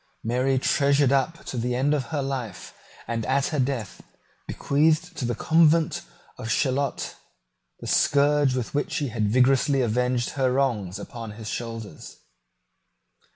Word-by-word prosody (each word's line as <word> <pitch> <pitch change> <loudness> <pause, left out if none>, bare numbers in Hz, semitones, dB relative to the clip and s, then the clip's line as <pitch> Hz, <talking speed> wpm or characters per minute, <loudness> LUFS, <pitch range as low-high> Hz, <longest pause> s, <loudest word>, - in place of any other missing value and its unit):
Mary 125 +3 +1
treasured 140 +1 +3
up 140 +5 0
to 130 - -5
the 125 +1 -1
end 140 +4 +2
of 140 -4 -1
her 145 +1 -3
life, 125 -8 -5 0.3
and 115 -1 -2
at 135 +1 +2
her 150 - -2
death 125 -7 -2 0.5
bequeathed 160 +4 +1
to 130 - -3
the 120 0 -1
convent 160 +3 +3 0.4
of 110 - -5
Chaillot, 135 +3 -1 0.6
the - - -8
scourge 145 -1 +3
with 125 -3 -3
which 145 - -1
he 145 -3 -1
had 110 -2 -1
vigorously 130 +4 +3
avenged 125 +1 0
her 130 -2 +1
wrongs 115 -9 0
upon 115 0 -8
his 110 0 -9
own - - -3
shoulders. 115 -7 -7
130 Hz, 150 wpm, -25 LUFS, 120-140 Hz, 0.6 s, treasured